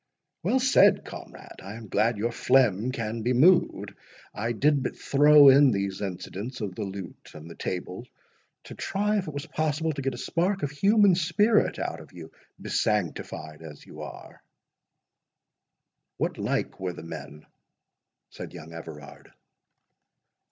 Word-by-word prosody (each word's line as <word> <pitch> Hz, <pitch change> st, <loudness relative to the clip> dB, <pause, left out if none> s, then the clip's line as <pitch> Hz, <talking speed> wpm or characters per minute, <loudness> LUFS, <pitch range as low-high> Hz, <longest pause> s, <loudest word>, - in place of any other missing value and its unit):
"Well 260 Hz, -, +1 dB
said, 265 Hz, +2 st, +4 dB
comrade—I 100 Hz, +3 st, -10 dB
am 115 Hz, -1 st, -10 dB
glad 110 Hz, +3 st, +1 dB
your 115 Hz, +3 st, -1 dB
phlegm 120 Hz, -2 st, +2 dB
can 115 Hz, -2 st, -4 dB
be 120 Hz, +3 st, 0 dB
moved. 170 Hz, +9 st, +3 dB, 0.4 s
I 115 Hz, +3 st, -2 dB
did 140 Hz, +4 st, +2 dB
but 125 Hz, -, -3 dB
throw 145 Hz, 0 st, +6 dB
in 140 Hz, +1 st, +7 dB
these 100 Hz, -3 st, -2 dB
incidents 100 Hz, +5 st, -6 dB
of 105 Hz, -4 st, -4 dB
the 110 Hz, -, -7 dB
lute 95 Hz, -2 st, -9 dB
and 75 Hz, +1 st, -10 dB
the 85 Hz, -, -9 dB
table, 90 Hz, +8 st, -5 dB, 0.6 s
to -, -, -10 dB
try 210 Hz, +2 st, -1 dB
if 185 Hz, -, -5 dB
it 155 Hz, -, -6 dB
was 145 Hz, -, -4 dB
possible 155 Hz, +1 st, -1 dB
to 140 Hz, -, -5 dB
get 135 Hz, -1 st, -2 dB
a -, -, -9 dB
spark 180 Hz, +8 st, -1 dB
of 140 Hz, -, -1 dB
human 200 Hz, +5 st, +4 dB
spirit 185 Hz, +6 st, +2 dB
out -, -, -4 dB
of -, -, -15 dB
you, -, -, -11 dB, 0.3 s
besanctified 80 Hz, -6 st, -2 dB
as 75 Hz, -3 st, -11 dB
you -, -, -11 dB
are." -, -, -10 dB, 1.8 s
"What -, -, -2 dB
like -, -, -2 dB
were 95 Hz, -1 st, -3 dB
the -, -, -10 dB
men?" 75 Hz, -2 st, -9 dB, 0.9 s
said -, -, -9 dB
young 80 Hz, +2 st, -10 dB
Everard. 80 Hz, -3 st, -11 dB
120 Hz, 150 wpm, -26 LUFS, 95-150 Hz, 1.8 s, in